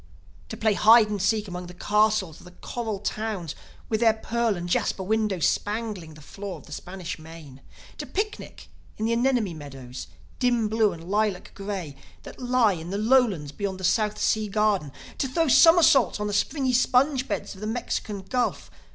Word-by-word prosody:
To 220 - -6
play 220 0 +2
hide 220 +1 +6
and 205 -2 -2
seek 210 +2 +1
among 180 -1 -6
the 180 - -11
castles 210 -4 +1
of - - -16
the 180 - -13
coral 225 -4 -4
towns 205 -5 -3 0.3
with 220 - 0
their 225 -1 +4
pearl 230 -2 -1
and 175 0 -5
jasper 190 +2 0
windows 210 -4 0
spangling 205 -7 -3
the 155 - -14
floor 195 +4 -7
of - - -15
the - - -16
Spanish 180 -2 -6
Main! 155 -4 -12 0.4
To - - -5
picnic 425 +2 -4 0.3
in 215 - -2
the 230 - +1
anemone 235 -5 +1
meadows, 135 - -9 0.3
dim 240 -3 +2
blue 220 -1 +2
and 165 -1 -9
lilac 205 -1 -1
gray, 195 -7 -5 0.3
that - - -11
lie 245 -4 +3
in 165 -1 -7
the 200 - -2
lowlands 215 - +2
beyond 195 +1 -4
the - - -8
South 210 +3 +1
Sea 215 +1 +1
Garden! 205 -7 +1 0.3
To 270 - +1
throw 325 +5 0
somersaults 315 - +6
on 210 - -2
the 205 - -2
springy 260 +5 0
sponge 255 +2 +2
beds - - -3
of 190 - -14
the 215 - -3
Mexican 215 -3 -3
Gulf! 205 - -2
210 Hz, 185 wpm, -25 LUFS, 180-230 Hz, 0.4 s, hide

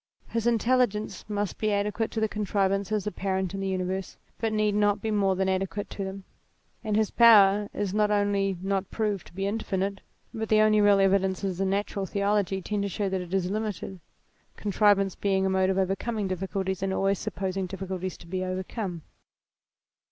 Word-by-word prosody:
His 230 0 -1
intelligence 235 -3 +1
must 205 -1 -2
be 215 -1 +1
adequate 210 +2 0
to 225 - -3
the 220 - +2
contrivances 200 0 0
apparent 190 -3 -2
in 195 - -4
the 195 - -2
universe, 185 0 -3 0.2
but 225 -1 0
need 215 -1 +1
not 205 0 +2
be 220 - -2
more 195 -2 +2
than 190 +1 0
adequate 190 +1 -2
to 200 - -4
them, 195 0 -6 0.6
and 215 -2 -1
his 215 -1 +1
power 210 -3 +6
is 200 -2 -3
not 210 0 +2
only 200 -2 +1
not 195 -1 -1
proved 210 -4 -2
to - - -17
be 195 +2 -3
infinite, 200 -2 -2 0.3
but 220 -1 -4
the 215 - +5
only 215 0 +5
real 205 -1 +5
evidences 190 -1 +1
in 195 - +1
natural 200 0 -1
theology 200 -1 0
tend 210 +1 -2
to 200 - -1
show 195 +1 -2
that 190 -1 -1
it 175 -1 -9
is 190 -1 0
limited, 210 -3 -4 0.6
contrivance 200 -2 +2
being 190 -1 0
a 190 - +1
mode 190 0 +2
of 190 - 0
overcoming 195 +3 -1
difficulties, 190 0 -3
and 195 0 -1
always 195 0 +1
supposing 190 -2 -3
difficulties 185 -1 -5
to - - -14
be 185 +2 -3
overcome. 185 -1 -4
195 Hz, 180 wpm, -27 LUFS, 190-210 Hz, 0.6 s, power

